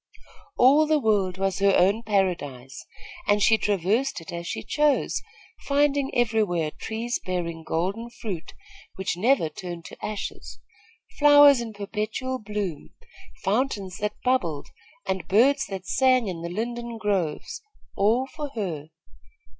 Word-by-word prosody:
All 285 +5 +6
the 310 0 +3
world 205 -8 +1
was 195 0 -1
her 195 -1 +4
own 200 +5 +3
paradise, 170 - -2 0.4
and 205 0 +4
she 220 +2 +4
traversed 210 +7 0
it 165 - -10
as 170 0 -5
she - - -4
chose, 295 -1 +1 0.5
finding 280 -1 +2
everywhere 215 -9 +1
trees 230 +6 -4
bearing 170 -3 -3
golden 195 +9 -2
fruit, 200 -8 -7 0.4
which 190 -1 -2
never 220 -1 +2
turned 175 +1 -8
to - - -12
ashes, 210 -1 -5 0.6
flowers 290 -3 +7
in 230 -1 -5
perpetual 215 +5 -3
bloom, 205 -7 -5 0.5
fountains 200 -4 -1
that 210 0 -3
bubbled 175 - 0 0.4
and 190 -3 -3
birds 270 +8 +4
that 190 -2 -6
sang 255 -1 +3
in 175 -3 -4
the 170 - -4
linden 235 +4 -4
groves, 205 - -2 0.3
all 225 +6 +2
for 290 +2 -6
her. 165 -9 -4
210 Hz, 130 wpm, -25 LUFS, 180-245 Hz, 0.6 s, flowers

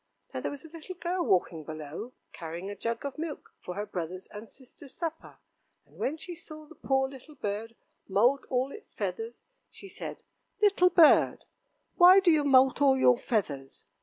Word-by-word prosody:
Now - - -3
there - - -2
was 285 +3 -8
a - - -11
little 330 +3 -9
girl 360 0 -2
walking 175 - +1
below, 155 - -7 0.2
carrying 170 +3 -6
a - - -6
jug 230 +4 -3
of 280 +2 -5
milk 320 -2 -6
for 180 - -7
her 205 +1 -3
brothers' 185 -2 -5
and 215 +2 -9
sisters' 260 +1 -13
supper, 325 -2 -5 0.5
and - - -23
when 300 +4 -1
she 350 +3 -7
saw 310 -2 -11
the 325 - -15
poor 265 -3 0
little 275 +3 -13
bird 220 -1 -4 0.3
moult 240 +8 +2
all 260 +2 0
its 435 - -13
feathers, 455 +1 -4 0.3
she 395 - -11
said: 380 - -8 0.4
"Little 400 -3 +4
bird, 335 -4 +5 0.5
why 365 +2 +9
do 375 -3 +4
you 305 -2 +3
moult 265 0 +4
all 270 -2 +5
your 250 -2 +4
feathers?" 140 - -3
265 Hz, 180 wpm, -29 LUFS, 205-325 Hz, 0.5 s, why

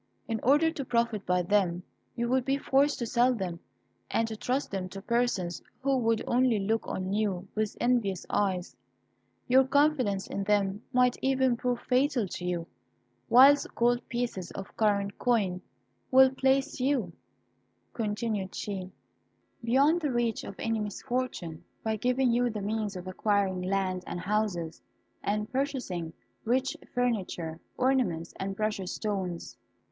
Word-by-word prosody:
In 225 -1 -1
order 295 +6 +4
to 295 -4 -4
profit 235 -4 0
by 180 0 +2
them 180 -2 +1 0.3
you 235 0 -1
would 255 +1 +2
be 270 +2 +1
forced 280 +1 +2
to 240 - -2
sell 245 +2 +3
them, 180 -5 -4 0.5
and 225 - +1
to 220 - -4
trust 255 +6 -2
them 190 -2 -3
to 195 - -7
persons 205 -5 0 0.2
who 275 0 +2
would 230 -3 +1
only 245 -2 +3
look 220 +3 -1
on 185 +1 -3
you 200 -3 -1
with 215 -1 -2
envious 230 -7 +1
eyes. 190 -3 -1 0.7
Your 260 +2 +6
confidence 265 -8 +2
in 200 - -3
them 200 0 +1
might 250 -1 +3
even 260 -2 +2
prove 245 0 -1
fatal 255 -3 +1
to 180 - -6
you, 175 -2 -2 0.6
whilst 275 +4 +6
gold 240 +1 +2
pieces 235 -7 -3
of 195 0 -8
current 200 -2 +1
coin 200 -7 +1 0.5
will 265 0 +7
place 265 0 +1
you," 255 -9 0 0.8
continued 210 -3 -2
she, 190 -3 -4 0.7
"beyond 280 +8 +3
the 300 - 0
reach 240 -2 0
of - - -7
any 225 -1 -1
misfortune, 210 -6 -3 0.2
by 220 -1 0
giving 250 +3 +2
you 245 +1 +2
the 215 -2 -4
means 210 -1 -2
of 180 0 -7
acquiring 195 -1 0
land 185 -1 -1
and 175 - -4
houses, 185 -5 -1 0.4
and 210 +1 -1
purchasing 255 - -2 0.3
rich 255 +3 +1 0.2
furniture, 190 -10 -1 0.2
ornaments, 245 -11 +1
and 195 0 -3
precious 210 -4 -2
stones." 190 -5 -3
220 Hz, 145 wpm, -29 LUFS, 195-250 Hz, 0.8 s, will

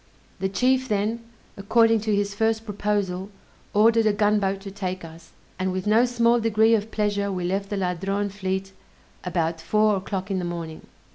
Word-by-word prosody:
The 190 - -1
chief 260 +6 +1
then, 215 +2 -1 0.3
according 225 +3 +3
to 215 0 0
his 200 0 -1
first 220 +1 0
proposal, 200 -3 -2 0.4
ordered 225 +1 +4
a 215 - +3
gunboat 205 -2 +1
to 195 0 -8
take 185 -2 -4
us, 165 0 -13 0.3
and 185 0 0
with 185 0 -3
no 220 +4 +4
small 240 -1 +2
degree 225 0 +3
of 215 -1 +1
pleasure 205 -2 -1
we 180 -2 -3
left 195 +3 -2
the 205 - -2
Ladrone 195 +2 -1
fleet 190 -1 -3 0.5
about 165 -2 -1
four 210 +5 +2
o'clock 190 0 -4
in 190 - 0
the - - -3
morning. 165 -2 -6
200 Hz, 170 wpm, -24 LUFS, 190-220 Hz, 0.5 s, ordered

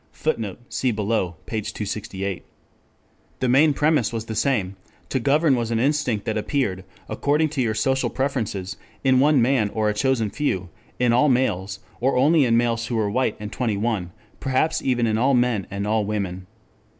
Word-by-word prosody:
[Footnote: 115 -9 -3
See 130 - 0
below 105 -5 -1
p. 110 -1 -3
268.] 100 -2 -4 1.0
The 130 - 0
main 140 +5 +5
premise 150 -6 +2
was 115 -1 -4
the 110 - -5
same: 105 -5 0 0.3
to 130 - 0
govern 145 +2 +3
was 120 -2 -2
an 115 - 0
instinct 130 -5 0
that 110 -1 -1
appeared, 105 -6 -1 0.2
according 150 +2 +1
to 140 -3 -2
your 110 -3 0
social 135 +3 +1
preferences, 110 -9 -3 0.3
in 130 -1 +4
one 145 -2 +4
man 120 -4 +2
or 110 0 0
a - - 0
chosen 115 -2 0
few, 95 -10 -2 0.3
in 120 -1 +2
all 140 +5 +4
males, 100 -7 0 0.2
or 130 +2 +1
only 145 +2 +4
in 115 -1 +3
males 115 -1 0
who 120 - -2
were 105 -2 0
white 130 +4 0
and 105 0 -6
twenty 115 -5 -1
one, 100 -5 -1 0.3
perhaps 135 +4 0
even 125 -3 +1
in 110 -1 +1
all 135 +2 +3
men 120 -6 +1
and 100 0 -3
all 110 0 +1
women. 95 -3 -3
115 Hz, 180 wpm, -23 LUFS, 105-135 Hz, 1.0 s, main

